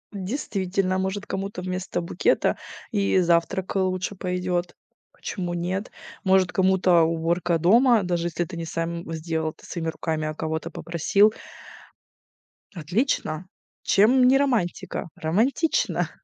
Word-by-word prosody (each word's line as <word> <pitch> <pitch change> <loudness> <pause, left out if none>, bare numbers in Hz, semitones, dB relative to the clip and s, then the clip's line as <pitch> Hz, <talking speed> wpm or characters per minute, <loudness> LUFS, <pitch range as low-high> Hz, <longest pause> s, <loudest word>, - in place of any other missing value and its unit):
Действительно, 195 -3 -2
может, 190 +2 -2
кому-то 195 -1 -4
вместо 185 0 -3
букета 170 +1 +1 0.3
и 200 -4 +2
завтрак, 175 +2 +1
э, - - +3
лучше 185 +1 -1
пойдет. 180 -1 -2 0.4
Почему 175 -3 -4
нет? 180 +4 -3 0.3
Может, 190 -1 +3
кому-то 185 -2 +4
уборка 165 +1 +1
дома, 230 +7 +5
даже 175 -2 -1
если 175 0 -1
ты 170 +1 -9
не 165 - -3
сам 165 +1 -4
сделал 160 0 -2
это - - -21
своими 165 -2 -4
руками, 160 -1 -2
а 155 - -3
кого-то 160 +1 -3
попросил. 170 +7 +2 1.4
Отлично. 175 - -1 0.4
Чем 250 +6 +5
не 265 +1 +6
романтика? 245 -15 -1
Романтично. 230 - +1
180 Hz, 120 wpm, -24 LUFS, 170-195 Hz, 1.4 s, не